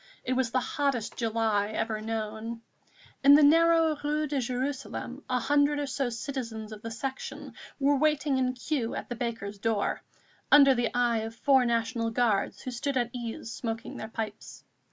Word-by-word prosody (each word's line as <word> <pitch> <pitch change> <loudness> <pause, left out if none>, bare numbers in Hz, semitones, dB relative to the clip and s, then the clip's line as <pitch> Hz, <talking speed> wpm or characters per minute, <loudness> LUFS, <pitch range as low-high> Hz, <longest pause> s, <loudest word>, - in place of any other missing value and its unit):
It 255 - -1
was 255 -2 +1
the 255 - +1
hottest 260 -3 -1
July 220 -3 +1
ever 220 0 -2
known. 220 +1 -4 0.6
In 280 +1 +9
the 300 - +6
narrow 330 +1 +5
Rue 300 +1 0
de 290 -1 -2
Jérusalem 260 +1 -3
a 255 - +2
hundred 290 +3 +2
or 290 - -1
so 270 -1 -1
citizens 230 -2 -5
of 215 -1 -9
the 230 - -5
Section 260 +4 -6 0.3
were 285 +1 +3
waiting 295 -1 +2
in 255 -1 +1
queue 250 -2 -2
at - - -6
the 240 - -3
baker's 225 -4 -4
door, 220 -1 0 0.5
under 280 -2 +8
the 240 -2 0
eye 240 -2 +2
of 225 +1 -5
four 265 0 +4
National 230 0 0
Guards 225 -3 0
who 255 - -4
stood 260 +3 -2
at 240 -1 0
ease 230 -2 -5
smoking 225 -1 -5
their 220 - -5
pipes. 220 -1 -6
245 Hz, 175 wpm, -28 LUFS, 225-275 Hz, 0.6 s, In